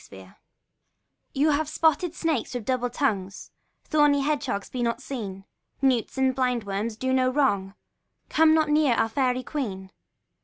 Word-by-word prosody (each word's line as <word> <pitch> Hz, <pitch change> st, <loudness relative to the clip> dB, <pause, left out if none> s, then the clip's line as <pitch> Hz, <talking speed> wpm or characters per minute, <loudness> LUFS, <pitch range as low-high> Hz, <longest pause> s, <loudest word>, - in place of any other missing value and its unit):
THE -, -, -17 dB
FAIRIES' 95 Hz, -1 st, -13 dB
SONG -, -, -22 dB, 1.2 s
You 315 Hz, -, -1 dB
spotted 320 Hz, +2 st, +1 dB
snakes 310 Hz, -7 st, -1 dB
with 240 Hz, -4 st, -4 dB
double 250 Hz, 0 st, 0 dB
tongue, 215 Hz, -8 st, -1 dB, 0.5 s
Thorny 295 Hz, -2 st, +3 dB
hedge 290 Hz, 0 st, -1 dB
hogs, 200 Hz, -5 st, -3 dB
be 250 Hz, -, -3 dB
not 235 Hz, 0 st, 0 dB
seen; 205 Hz, -8 st, -6 dB, 0.3 s
Newts, 260 Hz, -2 st, +1 dB
and 265 Hz, 0 st, +2 dB
blind 250 Hz, -3 st, 0 dB
worms, 210 Hz, +2 st, -3 dB
do 260 Hz, +2 st, -1 dB
no 255 Hz, -1 st, +3 dB
wrong; 205 Hz, -8 st, 0 dB, 0.5 s
Come 315 Hz, 0 st, +4 dB
not 310 Hz, -1 st, +2 dB
near 295 Hz, -5 st, +3 dB
our 225 Hz, -, +1 dB
fairy 255 Hz, 0 st, 0 dB
queen. 195 Hz, -12 st, -5 dB
255 Hz, 160 wpm, -25 LUFS, 220-290 Hz, 1.2 s, Come